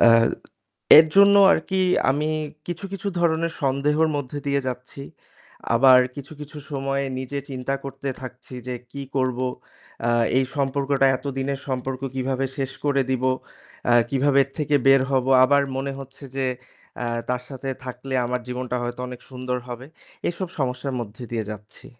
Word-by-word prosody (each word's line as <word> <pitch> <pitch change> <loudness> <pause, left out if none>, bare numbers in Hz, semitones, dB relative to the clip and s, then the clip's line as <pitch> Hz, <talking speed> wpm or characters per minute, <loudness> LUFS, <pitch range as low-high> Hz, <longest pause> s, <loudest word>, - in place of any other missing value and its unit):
অ্যা 115 - +8 0.9
এর 160 - +8
জন্য 200 0 +8 0.2
আরকি 190 +4 0 0.3
আমি 150 +3 0 0.4
কিছু, 175 +2 -5
কিছু 195 +1 -3
ধরনের 165 -1 +1
সন্দেহের 145 +4 +2
মধ্যে 145 0 -4
দিয়ে 140 0 +2
যাচ্ছি। 125 +2 -6 0.7
আবার 130 +2 +7 0.2
কিছু, 140 +1 -8
কিছু 150 +1 -8
সময়ে 135 -1 -1
নিজে 130 +2 -4
চিন্তা 130 +1 -2
করতে 135 0 -5
থাকছি 130 0 -10
যে 125 - -3 0.2
কী 140 - -5
করব? 130 -2 +1 0.6
অ্যা 120 0 +2 0.3
এই 135 - +3
সম্পর্কটা 140 0 +2
এতদিনের 135 0 -3
সম্পর্ক 130 0 -3
কিভাবে 135 0 -1
শেষ 135 -2 -2
করে 140 -2 +3
দিব? 130 -1 0 0.6
অ্যা 120 - +4 0.2
কিভাবে 140 +1 +3
এর 135 - -20
থেকে 150 -1 0
বের 135 0 +7
হব? 130 -2 +2 0.2
আবার 140 +2 +4
মনে 135 +1 -2
হচ্ছে 135 +1 -11
যে, 135 - 0 0.5
অ্যা 120 - -2 0.2
তার 125 0 -1
সাথে 135 -1 -6 0.2
থাকলে 130 +1 -6
আমার 125 +1 -1
জীবনটা 125 0 -3
হয়তো 120 +1 -4
অনেক 125 -1 -8
সুন্দর 125 -1 -3
হবে। 120 +1 -7 0.4
এসব 175 +1 -3
সমস্যার 130 0 -2
মধ্যে 110 +1 -8
দিয়ে 115 -2 -2
যাচ্ছি। 105 0 -10
135 Hz, 155 wpm, -24 LUFS, 125-140 Hz, 0.9 s, অ্যা